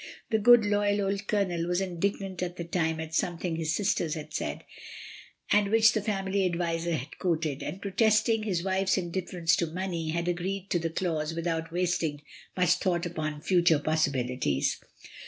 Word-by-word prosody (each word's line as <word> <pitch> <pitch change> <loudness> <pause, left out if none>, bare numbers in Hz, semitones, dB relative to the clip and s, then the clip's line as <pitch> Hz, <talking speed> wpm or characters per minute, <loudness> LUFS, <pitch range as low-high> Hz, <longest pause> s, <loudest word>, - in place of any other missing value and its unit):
The 220 - +3
good, 240 0 +7
loyal 205 0 +1
old 200 +1 -2
Colonel 180 -5 0
was 175 0 +1
indignant 190 0 -2
at 180 -1 -3
the 170 - -3
time 160 -1 -1
at 160 0 -6
something 175 0 -1
his 160 0 -1
sisters 175 -5 0
had 155 -1 -8
said, - - -3 0.9
and 205 -1 +4
which 220 0 +6
the 215 - 0
family 195 -1 -1
adviser 170 -1 0
had 140 0 -7
quoted; 160 -5 -1
and 190 - -5
protesting 220 +2 +2
his 190 -6 -1
wife's 190 0 +1
indifference 175 -2 0
to 170 - 0
money, 170 -1 -3
had 170 +2 -1
agreed 185 +2 -3
to 175 - +2
the 165 0 -2
clause 160 -2 -2
without 165 -1 -2
wasting 170 -4 -1 0.3
much 180 -2 +3
thought 175 -2 0
upon 155 -3 -4
future 175 -2 +4
possibilities. 130 - 0
175 Hz, 165 wpm, -28 LUFS, 160-195 Hz, 0.9 s, good